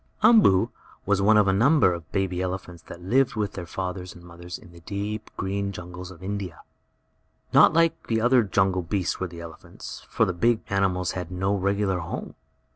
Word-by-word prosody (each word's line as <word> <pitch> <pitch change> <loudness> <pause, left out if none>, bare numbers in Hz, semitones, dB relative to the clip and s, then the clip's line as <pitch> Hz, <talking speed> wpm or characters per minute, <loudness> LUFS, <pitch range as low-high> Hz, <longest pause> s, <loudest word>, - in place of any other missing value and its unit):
Umboo 215 - +6 0.4
was 100 0 +2
only 100 - +1
one 110 0 +6
of 105 -2 +4
a 95 - +3
number 120 - +4
of 85 -1 -8
baby 95 -2 -1
elephants 90 -2 -5
that 85 - -10
lived 125 +8 +2
with 105 -2 -2
their 90 -2 -7
fathers 90 +1 -5
and 85 - -14
mothers 85 +1 -9
in 105 -9 -16
the 85 - -14
deep, 105 +4 -5
green 100 +1 -2
jungles 90 0 -8
of 95 -1 -13
India. 95 -4 -5 0.9
Not - - +7
like 165 0 +2
the 115 -1 +1
other 120 +2 +4
jungle 95 -2 +1
beasts 90 +1 -2
were 95 - -2
the 85 -1 -10
elephants, 85 -1 -10
for - - +2
the 90 - -1
big 115 +6 +2
animals 95 -2 +1
had 90 -2 -5
no 95 +2 -1
regular 100 -1 0
home. 85 0 -6
95 Hz, 195 wpm, -25 LUFS, 90-105 Hz, 0.9 s, Not